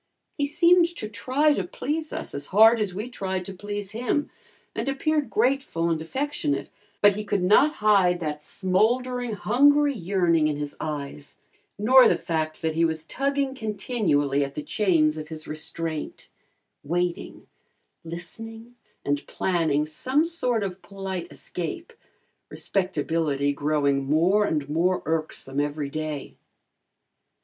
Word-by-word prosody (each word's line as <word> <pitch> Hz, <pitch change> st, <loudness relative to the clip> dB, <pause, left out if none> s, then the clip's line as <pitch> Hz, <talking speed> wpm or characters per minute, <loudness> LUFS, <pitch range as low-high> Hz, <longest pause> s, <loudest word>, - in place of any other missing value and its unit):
He 285 Hz, -1 st, 0 dB
seemed 340 Hz, +3 st, +5 dB
to 215 Hz, -, -4 dB
try 260 Hz, +8 st, +1 dB
to 195 Hz, -, -1 dB
please 305 Hz, -, -4 dB
us -, -, -5 dB
as 140 Hz, -, -4 dB
hard 220 Hz, +4 st, +6 dB
as 205 Hz, -3 st, 0 dB
we 210 Hz, +5 st, -4 dB
tried 190 Hz, -6 st, -3 dB
to 195 Hz, -, -6 dB
please 205 Hz, +1 st, -5 dB
him, 250 Hz, +6 st, -1 dB, 0.4 s
and -, -, -2 dB
appeared 300 Hz, +2 st, 0 dB
grateful 230 Hz, -9 st, +1 dB
and 160 Hz, -1 st, -1 dB
affectionate, 290 Hz, -, -2 dB, 0.3 s
but 205 Hz, -1 st, +6 dB
he 210 Hz, -, -4 dB
could 200 Hz, -2 st, -1 dB
not 280 Hz, +11 st, +5 dB
hide 185 Hz, -4 st, +4 dB
that 150 Hz, -3 st, -4 dB
smoldering, 240 Hz, +7 st, 0 dB
hungry 285 Hz, +6 st, +4 dB
yearning 175 Hz, -, +2 dB
in 150 Hz, -1 st, -1 dB
his 145 Hz, -1 st, -5 dB
eyes 145 Hz, -1 st, -5 dB, 0.4 s
nor 250 Hz, +5 st, +7 dB
the -, -, +3 dB
fact 155 Hz, -1 st, -3 dB
that 160 Hz, -1 st, 0 dB
he 165 Hz, +1 st, +1 dB
was 160 Hz, -1 st, -1 dB
tugging 275 Hz, -, -1 dB
continually 205 Hz, -, 0 dB
at 140 Hz, 0 st, -6 dB
the 150 Hz, -, -4 dB
chains 165 Hz, -2 st, +2 dB
of 155 Hz, -, -7 dB
his 155 Hz, -1 st, -8 dB
restraint, 155 Hz, 0 st, -5 dB, 0.5 s
waiting, 175 Hz, +3 st, -2 dB, 0.6 s
listening 225 Hz, +8 st, -8 dB, 0.3 s
and 145 Hz, 0 st, -1 dB
planning 160 Hz, -5 st, 0 dB
some 260 Hz, -, 0 dB
sort 250 Hz, -10 st, -1 dB
of 190 Hz, -1 st, -5 dB
polite 190 Hz, -3 st, -5 dB
escape, 330 Hz, -, -6 dB, 0.6 s
respectability 160 Hz, -6 st, -1 dB
growing 140 Hz, -1 st, +1 dB
more 180 Hz, +8 st, +3 dB
and 150 Hz, -7 st, -1 dB
more 175 Hz, +5 st, +1 dB
irksome 155 Hz, -3 st, -2 dB
every 145 Hz, -1 st, -2 dB
day. 155 Hz, -2 st, -4 dB
185 Hz, 140 wpm, -25 LUFS, 155-245 Hz, 0.6 s, nor